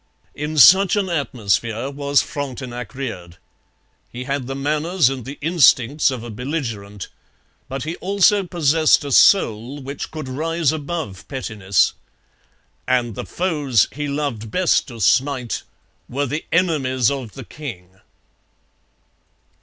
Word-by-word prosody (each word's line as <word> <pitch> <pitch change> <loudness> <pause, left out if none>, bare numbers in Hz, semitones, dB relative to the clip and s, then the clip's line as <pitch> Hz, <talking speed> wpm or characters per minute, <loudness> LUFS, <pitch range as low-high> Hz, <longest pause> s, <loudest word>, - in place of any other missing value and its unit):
In 150 +1 -4
such 190 +7 +7
an 200 -2 0
atmosphere 120 - -1
was 140 0 +1
Frontenac 130 -4 -6
reared. 90 -11 -6 0.7
He 125 +1 -6
had 135 -1 -3
the 135 - -4
manners 150 +2 +1
and 130 -3 -6
the 140 +2 -7
instincts 150 -4 +4
of 130 -4 -5
a 120 - -7
belligerent. 110 - -5 0.6
But 135 0 -4
he 160 +3 -5
also 200 +1 +3
possessed 160 -4 +3
a 140 - -4
soul 125 - +4
which 140 +1 -6
could 155 -3 -7
rise 160 +3 0
above 150 - -5
pettiness. 105 -8 0 0.9
And 125 -3 +1
the - - -7
foes 150 - +1
he 145 +1 -4
loved 140 -7 -3
best 180 +4 +2
to 120 -4 -10
smite 130 +4 +1 0.5
were 140 +3 -1
the 150 +4 -4
enemies 135 -9 +2
of 130 -6 -5
the 135 - -9
king. 95 -12 -9
135 Hz, 130 wpm, -20 LUFS, 120-155 Hz, 0.9 s, such